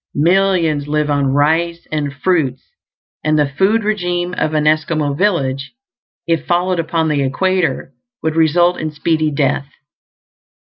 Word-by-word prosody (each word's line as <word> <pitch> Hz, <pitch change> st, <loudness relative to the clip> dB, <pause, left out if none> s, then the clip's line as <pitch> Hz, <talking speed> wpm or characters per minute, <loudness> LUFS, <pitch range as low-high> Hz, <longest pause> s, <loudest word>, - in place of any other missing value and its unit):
Millions 170 Hz, -2 st, +2 dB
live 150 Hz, 0 st, 0 dB
on 140 Hz, -1 st, +1 dB
rice 165 Hz, +4 st, +1 dB
and 150 Hz, -2 st, -2 dB
fruits; 140 Hz, -3 st, -1 dB, 0.6 s
and 155 Hz, 0 st, +2 dB
the 150 Hz, -, +3 dB
food 195 Hz, +10 st, +1 dB
regimen 180 Hz, -4 st, -1 dB
of 155 Hz, -3 st, -1 dB
an 150 Hz, 0 st, +1 dB
Esquimaux 155 Hz, -1 st, +1 dB
village, 140 Hz, -7 st, -1 dB, 0.5 s
if 165 Hz, -1 st, -1 dB
followed 180 Hz, +1 st, +1 dB
upon 165 Hz, 0 st, 0 dB
the 150 Hz, -2 st, 0 dB
equator, 185 Hz, +6 st, -1 dB, 0.3 s
would 160 Hz, 0 st, -1 dB
result 175 Hz, +2 st, +3 dB
in 155 Hz, -, -2 dB
speedy 155 Hz, +1 st, 0 dB
death. 140 Hz, -1 st, -1 dB
155 Hz, 135 wpm, -17 LUFS, 145-175 Hz, 0.6 s, the